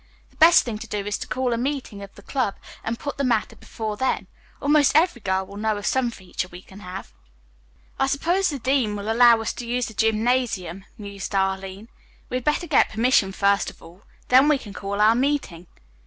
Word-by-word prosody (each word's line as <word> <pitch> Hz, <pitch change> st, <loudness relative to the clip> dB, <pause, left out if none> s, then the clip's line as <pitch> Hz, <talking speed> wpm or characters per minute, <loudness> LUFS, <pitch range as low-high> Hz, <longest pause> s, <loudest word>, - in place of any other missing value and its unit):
The -, -, -26 dB
best 330 Hz, +2 st, +7 dB
thing 220 Hz, -3 st, -5 dB
to 230 Hz, -, -8 dB
do 205 Hz, -2 st, -3 dB
is 205 Hz, 0 st, -2 dB
to -, -, -6 dB
call 255 Hz, -1 st, -1 dB
a 230 Hz, -, -1 dB
meeting 255 Hz, -6 st, -3 dB
of 200 Hz, 0 st, -11 dB
the 200 Hz, -, -15 dB
club 255 Hz, -5 st, -1 dB, 0.3 s
and 230 Hz, +1 st, -3 dB
put 285 Hz, +1 st, -6 dB
the -, -, +1 dB
matter 240 Hz, -5 st, 0 dB
before 215 Hz, -2 st, -6 dB
them. 260 Hz, +3 st, 0 dB, 0.3 s
Almost 290 Hz, 0 st, +3 dB
every 315 Hz, -6 st, +3 dB
girl 190 Hz, 0 st, -1 dB
will 200 Hz, -, -11 dB
know 215 Hz, 0 st, 0 dB
of 205 Hz, -, -6 dB
some 260 Hz, -2 st, +1 dB
feature 190 Hz, -4 st, -5 dB
we 180 Hz, +1 st, -12 dB
can 195 Hz, -, -14 dB
have." 185 Hz, -1 st, -8 dB, 0.9 s
"I 270 Hz, -, +2 dB
suppose 345 Hz, +8 st, +1 dB
the 290 Hz, -, -3 dB
dean 255 Hz, -4 st, 0 dB
will 205 Hz, +2 st, -3 dB
allow 235 Hz, 0 st, +6 dB
us 225 Hz, -, -2 dB
to 240 Hz, -, -7 dB
use 245 Hz, +1 st, 0 dB
the 220 Hz, -, -8 dB
gymnasium," 220 Hz, -4 st, 0 dB
mused 200 Hz, -1 st, -6 dB
Arline. 190 Hz, +2 st, -2 dB, 0.4 s
"We 250 Hz, -, 0 dB
had 255 Hz, -, -5 dB
better 300 Hz, +5 st, 0 dB
get -, -, +3 dB
permission 220 Hz, -3 st, +2 dB
first 200 Hz, +1 st, +1 dB
of -, -, -16 dB
all. 170 Hz, +4 st, -15 dB, 0.3 s
Then 260 Hz, +3 st, +6 dB
we 300 Hz, -2 st, +4 dB
can 210 Hz, -6 st, -11 dB
call 200 Hz, +1 st, -4 dB
our 215 Hz, +2 st, +6 dB
meeting." 245 Hz, -, -1 dB
225 Hz, 215 wpm, -23 LUFS, 200-260 Hz, 0.9 s, best